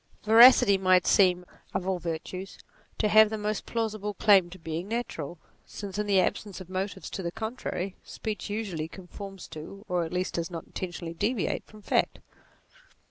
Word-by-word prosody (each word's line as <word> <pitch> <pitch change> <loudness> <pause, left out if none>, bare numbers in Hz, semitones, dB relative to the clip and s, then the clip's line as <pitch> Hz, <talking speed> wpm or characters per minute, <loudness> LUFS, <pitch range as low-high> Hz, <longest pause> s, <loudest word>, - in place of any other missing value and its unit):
Veracity 225 -3 +8
might 185 -1 +4
seem, 180 -2 +4 0.3
of 185 - -1
all 190 -2 0
virtues, 175 +3 -5 0.4
to 215 - +2
have 215 +1 +7
the 220 - -3
most 210 0 -3
plausible 215 -3 -2
claim 195 -3 +5
to 185 - -11
being 165 +1 -5
natural, 180 -9 -4 0.3
since 200 -1 -7
in 210 - -1
the 195 -2 +4
ab 180 - +2
sence 205 -3 -10
of 185 -1 -11
motives 190 +2 -3
to 195 - -4
the 170 -2 -3
contrary, 220 -3 -4
speech 215 -2 -5
usually 200 -7 -3
con 185 +2 -12
forms 195 0 -9
to, 195 +7 -10
or 180 -1 0
at 160 - -5
least 180 +1 -2
does 170 -1 -2
not 165 -2 -7
intentionally 175 -2 -6
deviate 210 +5 -1
from, 215 -1 -15
fact. - - +1
195 Hz, 180 wpm, -28 LUFS, 175-210 Hz, 0.4 s, Veracity